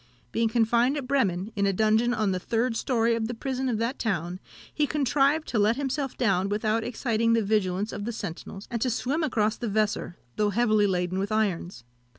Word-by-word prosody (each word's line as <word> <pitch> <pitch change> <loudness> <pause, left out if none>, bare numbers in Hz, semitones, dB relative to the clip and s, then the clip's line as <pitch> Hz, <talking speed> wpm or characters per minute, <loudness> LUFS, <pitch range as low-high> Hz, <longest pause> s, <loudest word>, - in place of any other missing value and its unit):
Being 230 0 +1
confined 235 +4 +2
at 280 - -4
Bremen, 210 -7 0
in 200 -1 +1
a 195 - +1
dungeon 220 +4 +2
on 215 -5 +1
the 185 - -1
third 230 +4 -1
story 235 -1 +1
of 225 -1 -1
the 240 - -4
prison 260 +2 -2
of 230 - 0
that 235 +5 -2
town, 180 -4 -2 0.3
he 300 -1 +1
contrived 290 +2 +2
to 230 - 0
let 210 +3 +3
himself 275 0 -3
down 195 -5 +1
without 215 +2 0
exciting 230 -1 0
the 230 -1 +2
vigilance 200 -1 0
of 205 - -5
the 235 - -2
sentinels, 195 -1 -7
and 235 -2 -2
to 255 - +1
swim 265 +7 -1
across 220 -7 +1
the 235 - -3
Weser, 205 -4 -1 0.2
though 210 -1 +2
heavily 215 -1 +3
laden 180 0 -1
with 200 +2 -2
irons. 190 - -1
225 Hz, 200 wpm, -26 LUFS, 205-245 Hz, 0.3 s, let